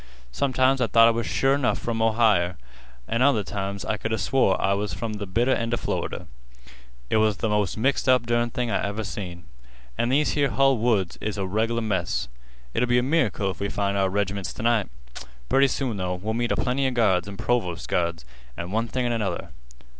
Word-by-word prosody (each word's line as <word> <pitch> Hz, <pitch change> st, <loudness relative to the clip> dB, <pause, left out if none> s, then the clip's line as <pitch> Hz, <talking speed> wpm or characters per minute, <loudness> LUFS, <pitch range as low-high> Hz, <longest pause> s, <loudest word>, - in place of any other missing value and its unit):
Sometimes 130 Hz, -, +2 dB
I 125 Hz, -, +3 dB
thought 115 Hz, 0 st, +6 dB
I -, -, +5 dB
was 115 Hz, 0 st, -2 dB
sure 135 Hz, +1 st, +2 dB
'nough 130 Hz, -, +1 dB
from 115 Hz, -1 st, -3 dB
Ohier, 110 Hz, -6 st, +3 dB, 0.5 s
an' 115 Hz, +2 st, -1 dB
other 130 Hz, -6 st, +4 dB
times 100 Hz, 0 st, -4 dB
I 110 Hz, -, -1 dB
could 115 Hz, -, -4 dB
'a 110 Hz, -, +1 dB
swore 125 Hz, -8 st, +2 dB
I 100 Hz, -, +2 dB
was 100 Hz, +1 st, -2 dB
from 115 Hz, -2 st, -4 dB
th' 100 Hz, -3 st, -6 dB
bitter 120 Hz, +6 st, +2 dB
end 115 Hz, 0 st, 0 dB
of -, -, -6 dB
Florida. -, -, -3 dB, 0.9 s
It -, -, +3 dB
was 110 Hz, -3 st, +2 dB
th' -, -, -16 dB
most 105 Hz, -4 st, 0 dB
mixed 135 Hz, +3 st, +1 dB
up 125 Hz, -2 st, +4 dB
dern 120 Hz, 0 st, +1 dB
thing 120 Hz, 0 st, -2 dB
I -, -, 0 dB
ever 100 Hz, +2 st, -2 dB
see. 90 Hz, -4 st, -6 dB, 0.6 s
An' 120 Hz, -, +1 dB
these 145 Hz, +3 st, +2 dB
here 145 Hz, -2 st, +1 dB
hull 135 Hz, -3 st, +3 dB
woods 105 Hz, -6 st, 0 dB
is 110 Hz, -1 st, -3 dB
a 95 Hz, -, -1 dB
reg'lar 110 Hz, +4 st, 0 dB
mess. 95 Hz, -, -1 dB, 0.4 s
It'll 125 Hz, +1 st, 0 dB
be 120 Hz, -, +4 dB
a 125 Hz, -, +2 dB
miracle 130 Hz, -9 st, +1 dB
if -, -, -11 dB
we 100 Hz, -, -2 dB
find 100 Hz, -1 st, -1 dB
our 95 Hz, -1 st, +2 dB
reg'ments 100 Hz, -3 st, -2 dB
t' -, -, -6 dB
night. 115 Hz, -4 st, +2 dB, 0.6 s
Pretty 135 Hz, +1 st, +5 dB
soon, 130 Hz, -4 st, -2 dB
though, 90 Hz, -1 st, -2 dB
we'll 105 Hz, +5 st, -3 dB
meet 120 Hz, +1 st, -1 dB
a -, -, +2 dB
plenty 130 Hz, +2 st, 0 dB
of 130 Hz, -, -3 dB
guards 100 Hz, -6 st, +2 dB
an' 100 Hz, -1 st, -8 dB
provost 95 Hz, -9 st, -1 dB
guards, 85 Hz, -5 st, -1 dB, 0.3 s
an' 85 Hz, +1 st, -5 dB
one 115 Hz, +3 st, 0 dB
thing 125 Hz, +2 st, -2 dB
an' 120 Hz, -, 0 dB
another. 110 Hz, -4 st, -2 dB
110 Hz, 215 wpm, -25 LUFS, 100-120 Hz, 0.9 s, thought